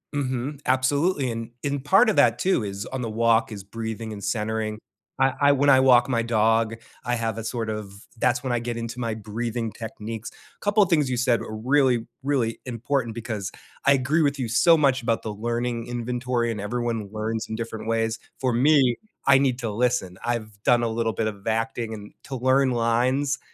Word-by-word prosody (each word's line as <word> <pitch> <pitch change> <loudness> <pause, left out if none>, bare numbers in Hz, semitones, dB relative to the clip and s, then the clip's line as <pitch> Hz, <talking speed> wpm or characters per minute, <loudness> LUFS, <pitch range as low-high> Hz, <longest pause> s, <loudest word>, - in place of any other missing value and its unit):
Mhm. 135 0 -2
Absolutely. 140 +3 +2
And 115 0 -5
and 140 -1 -2
part 195 - +5
of 220 - +1
that, - - +4
too, 185 - +2
is 100 +1 -5
on 130 -1 -4
the 115 - -3
walk 115 +1 +2
is 100 -3 -7
breathing 110 +1 -5
and 100 -1 -8
centering. 110 0 -2 0.4
I 135 0 +3
I 140 0 +6
when 140 +1 +3
I 130 -1 +7
walk 125 -2 +6
my 120 -3 +1
dog, 115 0 +2 0.3
I 120 0 +1
have 115 -2 -2
a 115 - -4
sort 115 -1 -3
of 105 -2 -5 0.3
that's 125 +3 +1
when 130 -2 -2
I 120 - +1
get 120 0 -4
into 115 +1 -5
my 115 -2 -2
breathing 115 +2 -3
techniques. 110 0 -7
A - - -23
couple 205 +1 +4
things 155 -7 +2
you 125 - -1
said 120 -1 +2
are - - -7
really, 125 0 +2 0.2
really 130 -5 0
important 120 -1 -2
because 110 -4 -4 0.3
I 140 - +6
agree 140 +5 +2
with 145 -2 +1
you 125 - -1
so 160 +9 +5
much 135 -3 +2
about 115 -1 0
the 110 - -3
learning 120 +2 -2
inventory 120 0 -1
and 105 -3 -4
everyone 115 -1 -2
learns 110 +1 -3
in 110 - -3
different 110 -1 -5
ways. 115 0 0 0.2
For 130 -2 +1
me, 130 0 +4 0.3
I 135 -1 +7
need 130 -3 +1
to 115 -3 -2
listen. 115 -5 0
I've 110 -4 -3
done 120 -1 +4
a 115 - +1
little 115 0 -1
bit 110 +2 -1
of 100 -2 -7
acting 115 0 -1
and 105 -1 -9
to 140 - -6
learn 130 +1 +3
lines, 125 +4 +1
120 Hz, 200 wpm, -25 LUFS, 110-130 Hz, 0.4 s, I